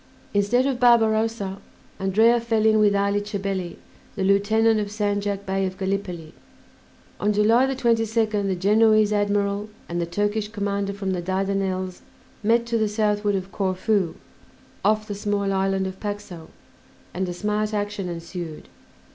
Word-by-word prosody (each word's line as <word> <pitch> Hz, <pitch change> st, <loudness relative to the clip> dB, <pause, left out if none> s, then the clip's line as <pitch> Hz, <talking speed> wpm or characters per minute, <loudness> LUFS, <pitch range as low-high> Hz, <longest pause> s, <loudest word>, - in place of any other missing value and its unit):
Instead 205 Hz, +6 st, +2 dB
of 270 Hz, -3 st, -1 dB
Barbarossa, 225 Hz, -4 st, +2 dB, 0.4 s
Andrea 220 Hz, +5 st, +4 dB
fell 225 Hz, -2 st, 0 dB
in 220 Hz, 0 st, +5 dB
with 205 Hz, -1 st, +4 dB
Ali 200 Hz, +1 st, +1 dB
Chabelli, 195 Hz, -3 st, -3 dB, 0.4 s
the 195 Hz, -, -2 dB
lieutenant 215 Hz, +3 st, +3 dB
of 205 Hz, -, -2 dB
Sandjak 205 Hz, -1 st, -2 dB
Bey 195 Hz, 0 st, -1 dB
of 185 Hz, 0 st, -7 dB
Gallipoli. 190 Hz, -4 st, -3 dB, 0.9 s
On 210 Hz, -, +1 dB
July 225 Hz, +5 st, +4 dB
22nd 225 Hz, -5 st, +1 dB
the 190 Hz, -, 0 dB
Genoese 215 Hz, +3 st, +4 dB
admiral 205 Hz, 0 st, 0 dB, 0.2 s
and 175 Hz, 0 st, -2 dB
the 170 Hz, -, -2 dB
Turkish 205 Hz, +4 st, -1 dB
commander 200 Hz, -2 st, -2 dB
from 195 Hz, -1 st, -3 dB
the 180 Hz, -2 st, -2 dB
Dardanelles 190 Hz, 0 st, -2 dB, 0.4 s
met 230 Hz, +2 st, +2 dB
to 235 Hz, -1 st, 0 dB
the 215 Hz, -, +2 dB
southward 210 Hz, -1 st, +1 dB
of 190 Hz, 0 st, -4 dB
Corfu, 185 Hz, -1 st, 0 dB, 0.7 s
off 215 Hz, +1 st, +2 dB
the 205 Hz, -, -4 dB
small 200 Hz, -1 st, -1 dB
island 195 Hz, 0 st, 0 dB
of 190 Hz, 0 st, -6 dB
Paxo, 205 Hz, -6 st, -6 dB, 0.6 s
and 185 Hz, +1 st, -2 dB
a -, -, -3 dB
smart 210 Hz, +3 st, -1 dB
action 205 Hz, -3 st, -3 dB
ensued. 170 Hz, -1 st, -7 dB
205 Hz, 145 wpm, -24 LUFS, 190-215 Hz, 0.9 s, in